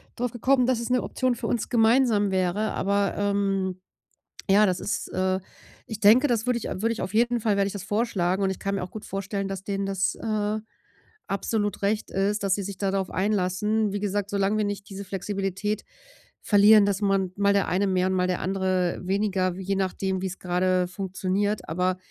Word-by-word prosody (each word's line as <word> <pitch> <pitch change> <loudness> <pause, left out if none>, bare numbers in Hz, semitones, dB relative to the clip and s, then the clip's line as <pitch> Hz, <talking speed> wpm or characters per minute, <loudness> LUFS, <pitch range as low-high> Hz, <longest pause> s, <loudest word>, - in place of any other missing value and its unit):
draufgekommen, 245 +2 +1
dass 250 -2 +1
es 235 - -4
'ne 250 -1 +2
Option 255 -2 0
für 230 -1 -4
uns 235 -2 -1
gemeinsam 225 -3 +3
wäre. 190 +3 0
Aber, 200 0 0
ähm, 195 -2 0 0.7
ja, 210 +2 +6
das 185 -2 0
ist - - -3
äh, 185 0 0 0.5
ich 220 -1 -6
denke, 225 +7 +6
das 235 -1 0
würde 250 -1 +1
ich - - -8
würde 225 +5 -1
ich 225 - -4
auf 190 - -5
jeden 240 +1 +2
Fall 210 -2 +1
werde 200 - +2
ich 200 - -3
das 200 -1 -6
vorschlagen 200 -3 0
und 190 - +2
ich 190 - -4
kann 200 0 -2
mir 190 - -3
auch 180 - -6
gut 215 - -8
vorstellen, 195 0 -3
dass 195 0 -5
denen 195 0 -2
das, 195 -1 0
äh, 215 -1 -1 0.7
absolut 205 +1 -2
recht 210 +2 0
ist, 200 +2 0
dass 195 -1 +2
sie 200 - -4
sich 195 0 -6
da 195 -1 -1
drauf 195 -1 -1
einlassen. 205 +2 0
Wie 205 - -1
gesagt, 205 -1 -1
solange 200 +1 +1
wir 215 - +1
nicht 205 0 -5
diese 200 0 -7
Flexibilität 195 +1 -3 0.6
verlieren, 205 0 +6
dass 200 0 0
man 195 -2 +1
mal 200 0 +3
der 200 - +1
eine 195 +2 +1
mehr 185 -1 +1
und 190 - 0
mal 180 -1 +1
der 180 -1 -1
andere 185 -1 0
weniger, 190 -1 0
je 190 +1 -2
nachdem, 190 0 -1
wie's 190 -1 -4
grade 180 0 +1
funktioniert, 195 +2 -2
aber 180 +2 0
200 Hz, 200 wpm, -25 LUFS, 190-215 Hz, 0.7 s, ja